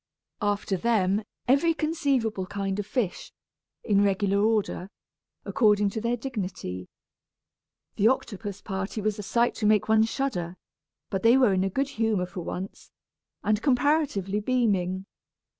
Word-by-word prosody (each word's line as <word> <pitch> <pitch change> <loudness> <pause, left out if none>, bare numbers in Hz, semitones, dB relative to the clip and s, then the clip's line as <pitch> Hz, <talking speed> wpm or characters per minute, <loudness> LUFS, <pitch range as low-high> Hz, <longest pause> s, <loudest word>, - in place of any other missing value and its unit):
After 205 -1 0
them, 205 -1 +1 0.2
every 285 +6 +3
conceivable 275 - 0
kind 195 0 -3
of 205 - -3
fish, 215 -5 -2 0.5
in 200 -2 +3
regular 200 0 +2
order, 210 -4 0 0.6
according 210 -3 +3
to 220 - -4
their 235 +2 0
dignity. 185 - -5 1.1
The 205 - +4
octopus 205 -5 -2
party 195 +1 -4
was 215 0 -1
a - - -2
sight 235 +4 +1
to 210 - +1
make 210 -1 +3
one 220 0 +5
shudder, 220 -8 -1 0.5
but 195 - -1
they 230 +3 +6
were 250 -7 +4
in 185 0 +2
a 195 - 0
good 275 +8 -1
humor 215 -5 +2
for 180 +1 -8
once, 185 +3 -6 0.5
and 215 +1 +1
comparatively 265 - +1
beaming. 200 -6 0
210 Hz, 140 wpm, -27 LUFS, 195-235 Hz, 1.1 s, they